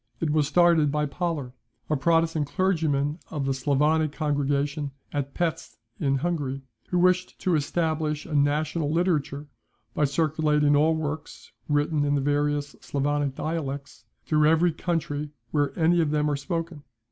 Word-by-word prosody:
It 160 - 0
was 150 -2 +2
started 165 -2 +4
by 150 0 0
Pollar, 150 -4 -3 0.3
a 155 - +1
Protestant 165 0 +2
clergyman 155 -3 0
of 145 -3 -3
the 135 - +1
Sclavonic 150 +3 +2
congregation 145 -1 -1 0.2
at 140 -1 -3
Pesth, 165 -1 -2 0.2
in 135 -1 +1
Hungary, 140 -3 -2 0.3
who 180 - 0
wished 185 +1 +2
to 185 - +1
establish 155 0 0
a 160 - -7
national 150 +2 +1
literature, 155 -4 0 0.5
by 150 - +2
circulating 150 0 +2
all 155 +2 +4
works, 155 -1 -5 0.2
written 145 0 +1
in 145 0 +1
the 140 - +1
various 145 0 0
Sclavonic 145 -1 -1
dialects, 140 -6 -4 0.2
through 150 -1 +3
every 165 +2 +4
country 150 -3 -2 0.2
where 145 -1 +1
any 170 +1 +4
of 160 - +1
them 150 0 +1
are - - +1
spoken. 165 +2 -4
150 Hz, 145 wpm, -26 LUFS, 145-160 Hz, 0.5 s, started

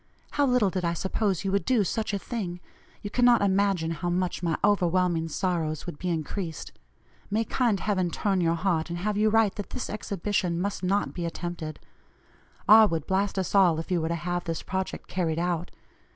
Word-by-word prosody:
How 285 -1 +2
little 250 -6 +3
did 185 -1 -2
I 170 0 +1
suppose 190 +1 -1
you 195 - 0
would 200 0 +1
do 245 -4 +2
such 220 +3 -2
a 200 - 0
thing; 195 -5 -4 0.4
you 205 - -5
cannot 245 -2 +4
imagine 195 -4 +2
how 175 +2 -2
much 180 +1 -1
my 165 -3 0
overwhelming 180 -4 +2
sorrows 160 -3 -2
would 175 -5 -7
be 180 - -2
increased. 165 +1 -4 0.6
May 215 +2 +1
kind 230 -6 +1
Heaven 185 -4 0
turn 195 +1 0
your 165 -1 +2
heart, 170 -2 0
and 170 - -3
have 210 +4 -1
you 215 +1 +3
write 220 -2 +3
that 205 - -5
this 255 - -5
exhibition 200 -4 -1
must 200 +2 -2
not 195 +2 0
be 175 - -4
attempted. 170 -2 -5 0.9
R. 215 +1 +9
would 165 -5 -2
blast 195 +1 0
us 190 - -2
all 185 -5 +5
if 165 - -6
you 175 -2 +2
were 160 - -1
to 170 - -1
have 175 +1 -3
this 165 -1 -3
project 190 0 -4
carried 165 -4 -1
out. 175 0 -1
185 Hz, 195 wpm, -27 LUFS, 170-205 Hz, 0.9 s, R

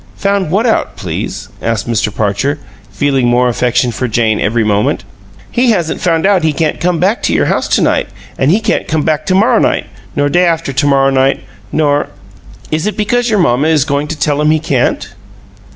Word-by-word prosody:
"Found 200 -3 0
what 200 +8 +1
out, 225 - 0
please?" - - -5
asked 115 -2 -2
Mr. 115 -1 0
Parcher, 105 +8 -1 0.3
feeling 130 +4 0
more 120 +1 +3
affection 125 0 +1
for 125 +2 -3
Jane 110 -1 +1
every 115 +2 +1
moment. 105 -1 0 0.5
"He 245 +1 +2
hasn't 175 -8 0
found 165 -1 +1
out 195 -2 +3
he 160 -1 +1
can't 155 0 -1
come 175 -1 0
back 195 +6 +1
to - - 0
your - - +2
house - - 0
to - - +2
night; - - +1 0.3
an' 135 - +1
he 200 +7 +3
can't 215 - -1
come 155 -1 0
back 155 -2 -1
to 185 - +2
morrow 210 +5 +3
night, - - +1 0.3
nor 145 0 +1
day 175 +5 +2
after 165 -4 -1
to 135 +2 +1
morrow 135 -1 +3
night, 135 0 +1 0.3
nor 145 -2 +1 0.3
" - - -21
"Is 155 +5 -1
it 210 - -3
because 240 +3 0
your 215 - +2
mamma 140 -4 +2
is 155 -4 +2
going 145 0 -1
to 160 - -5
tell 145 -1 0
him 150 - +2
he 155 - +3
can't?" 140 -5 -1
150 Hz, 210 wpm, -13 LUFS, 125-180 Hz, 0.5 s, more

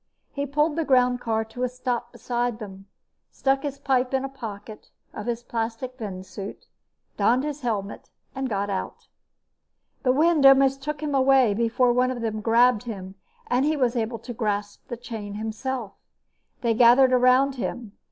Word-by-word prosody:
He 285 0 -3
pulled 300 +3 +1
the 330 - +1
groundcar 245 -5 +1
to 245 - -8
a 250 - +1
stop 250 -1 -3
beside 240 -1 -2
them, 195 -3 -10 0.4
stuck 270 0 0
his 280 -1 -4
pipe 260 -1 0
in 265 0 0
a - - -5
pocket 215 -5 -9 0.2
of 210 - -7
his 240 0 -2
plastic 230 +2 -4
venusuit, 195 -1 -7 0.5
donned 250 +3 +3
his 295 0 -4
helmet 210 -5 -4 0.2
and 265 -1 -3
got 200 -2 -1
out. 190 - -5 1.0
The 255 - +3
wind 310 +2 +3
almost 270 0 +6
took 300 +1 -4
him 295 -1 -2
away 265 -4 +4
before 235 +3 +2
one 250 +1 +2
of 250 -2 -4
them 215 -1 -2
grabbed 235 +1 +3
him 190 -5 -7 0.3
and 250 +2 +1
he 305 +1 +1
was 250 -3 +1
able 230 0 -1
to 240 +2 -8
grasp 205 -3 -3
the 240 - -5
chain 225 -4 -7
himself. 220 +1 -4 0.7
They 235 -2 +2
gathered 250 +3 +6
around 255 +2 +4
him. 235 -3 -4
245 Hz, 165 wpm, -25 LUFS, 220-265 Hz, 1.0 s, almost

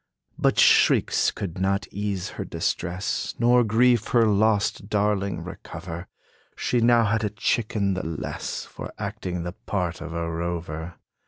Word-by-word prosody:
But - - +1
shrieks - - +5
could 90 -3 -5
not 100 +1 0
ease 100 -2 -3
her - - -5
distress, 90 +3 -2
Nor 120 +1 +5
grief 115 +1 +3
her 115 -2 +4
lost 105 -1 +2
darling 100 -2 0
recover. 85 +1 -8 0.5
She 120 - 0
now 120 0 +5
had 110 +2 +1
a 105 - +1
chicken 105 0 0
the 95 - -3
less, 80 -1 -4
For - - -8
acting 100 -4 -4
the 90 +1 -5
part 90 -5 -2
of 85 0 -6
a 85 0 -2
rover. 85 -1 -4
100 Hz, 145 wpm, -25 LUFS, 85-110 Hz, 0.5 s, shrieks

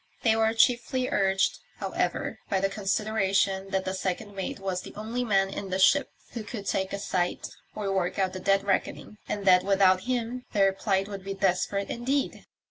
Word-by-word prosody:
They 225 -2 +4
were 220 0 +3
chiefly 250 +2 +2
urged, 195 0 +1 0.2
however, - - -2
by 195 - +1
the 195 +1 +1
consideration 195 -1 0
that 190 -1 -1
the 185 - -2
second 190 +2 -3
mate 195 +1 -4
was 190 -2 -2
the - - -11
only 225 +4 -3
man 195 -4 +2
in 195 0 -5
the 185 - -1
ship 265 +9 +4 0.2
who 235 - -5
could 210 -1 -7
take 190 0 -1
a - - -2
sight 180 -3 -2 0.3
or 200 -2 -2
work 180 -2 -1
out 190 -2 0
the 185 - -5
dead 195 +1 +2
reckoning, 200 +1 -2
and 205 -1 -3
that 180 -1 +6
without 190 -1 +4
him 245 0 -2
their 195 -2 +4
plight 195 0 0
would 200 -2 -7
be 195 0 -4
desperate 195 +1 0
indeed. 265 +4 -2
195 Hz, 190 wpm, -27 LUFS, 190-220 Hz, 0.3 s, that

